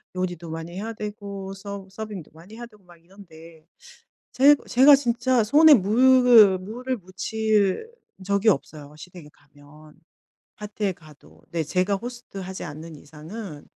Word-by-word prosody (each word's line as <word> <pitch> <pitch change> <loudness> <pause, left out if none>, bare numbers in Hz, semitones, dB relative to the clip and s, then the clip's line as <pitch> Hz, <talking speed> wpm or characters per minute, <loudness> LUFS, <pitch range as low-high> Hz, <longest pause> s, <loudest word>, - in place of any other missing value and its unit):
요리도 175 -2 -4
많이 165 +1 -7
해야 220 +4 -5
되고 200 -2 -7
서 195 0 -9
서빙도 205 -5 -8
많이 175 +7 -15
해야 240 - -8
되고 210 -4 -24
막 175 -1 -19
이런데 165 -4 -17 0.7
제 285 +3 +5
제가 275 +3 +6
진짜 245 -2 0
손에 300 +7 +6
물을 235 -2 +5
물을 245 +7 -5
묻힐 210 - -2 0.3
적이 200 +2 0
없어요. 150 -6 -5
시댁에 170 -1 -13
가면. 145 +1 -20 0.6
파티에 210 -1 -4
가도. 155 -4 -20
네, 165 -1 -2
제가 185 +5 -1
호스트 240 -1 -9
하지 190 -1 -7
않는 155 +1 -9
이상은 155 +3 -11
195 Hz, 280 characters per minute, -23 LUFS, 165-225 Hz, 0.7 s, 제가